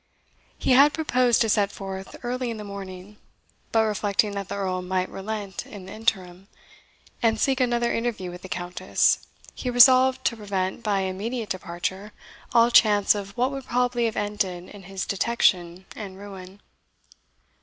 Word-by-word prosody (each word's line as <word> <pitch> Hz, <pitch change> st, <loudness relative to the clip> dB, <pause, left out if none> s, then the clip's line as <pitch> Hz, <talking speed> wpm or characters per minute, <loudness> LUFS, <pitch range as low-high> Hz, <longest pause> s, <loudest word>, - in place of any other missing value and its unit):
He -, -, 0 dB
had 280 Hz, +3 st, +6 dB
proposed 255 Hz, -6 st, +2 dB
to 225 Hz, -, +2 dB
set 205 Hz, -1 st, +2 dB
forth 190 Hz, -1 st, -7 dB
early 250 Hz, 0 st, -2 dB
in 230 Hz, -, -4 dB
the 210 Hz, -, -7 dB
morning; 200 Hz, 0 st, -9 dB, 0.5 s
but 225 Hz, -1 st, +4 dB
reflecting 210 Hz, -1 st, +1 dB
that 200 Hz, -1 st, -5 dB
the -, -, -3 dB
Earl 185 Hz, -2 st, -2 dB
might 185 Hz, 0 st, -2 dB
relent 200 Hz, 0 st, -5 dB
in 200 Hz, -3 st, -10 dB
the -, -, -9 dB
interim, 190 Hz, -4 st, -2 dB, 0.7 s
and 225 Hz, -1 st, +2 dB
seek 270 Hz, -1 st, +1 dB
another 240 Hz, -1 st, +1 dB
interview 230 Hz, -6 st, -2 dB
with 180 Hz, 0 st, -10 dB
the 190 Hz, -, -10 dB
Countess, 175 Hz, 0 st, 0 dB, 0.3 s
he 255 Hz, -, -4 dB
resolved 255 Hz, +1 st, +6 dB
to 230 Hz, -, +2 dB
prevent, 195 Hz, -2 st, -3 dB
by 205 Hz, -3 st, 0 dB
immediate 210 Hz, +5 st, -3 dB
departure, 190 Hz, +3 st, -4 dB, 0.4 s
all 235 Hz, 0 st, +5 dB
chance 210 Hz, -3 st, +5 dB
of 200 Hz, -1 st, -7 dB
what 250 Hz, +3 st, +1 dB
would 275 Hz, -2 st, -6 dB
probably 245 Hz, -1 st, +1 dB
have 225 Hz, -, -2 dB
ended 195 Hz, -4 st, -2 dB
in 205 Hz, -, -12 dB
his 190 Hz, 0 st, -5 dB
detection 185 Hz, -4 st, +1 dB
and 195 Hz, -3 st, -8 dB
ruin. 195 Hz, 0 st, -11 dB
205 Hz, 160 wpm, -25 LUFS, 190-235 Hz, 0.7 s, had